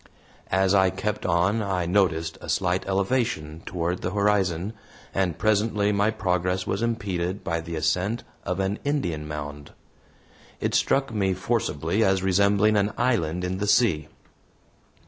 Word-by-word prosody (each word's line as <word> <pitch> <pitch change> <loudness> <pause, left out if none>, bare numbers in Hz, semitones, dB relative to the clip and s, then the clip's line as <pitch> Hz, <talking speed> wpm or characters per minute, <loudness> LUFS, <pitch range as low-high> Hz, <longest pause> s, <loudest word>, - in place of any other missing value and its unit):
As 95 +1 +2
I 95 -1 +5
kept 105 +3 -3
on 90 +6 +2
I 95 -4 -1
noticed 85 -3 +1
a - - -8
slight 95 0 0
elevation 95 -6 -1
toward 90 0 -2
the - - -1
horizon, 100 -2 +1 0.4
and 95 -4 0
presently 105 -1 +2
my 100 +1 +2
progress 90 -2 -1
was 100 - -2
impeded 95 -5 -2
by 85 0 -1
the 80 +1 -6
ascent 90 +9 0 0.2
of - - -2
an 95 +2 -1
Indian 90 - -1
mound. 75 -1 -7 0.9
It - - -1
struck 135 -3 +2
me 95 -3 +1
forcibly 95 -2 0
as 95 -2 +2
resembling 100 +3 +3
an 100 +1 +1
island 90 -9 0
in 90 +1 -2
the 105 - -1
sea. 90 -10 +3
95 Hz, 145 wpm, -25 LUFS, 85-105 Hz, 0.9 s, I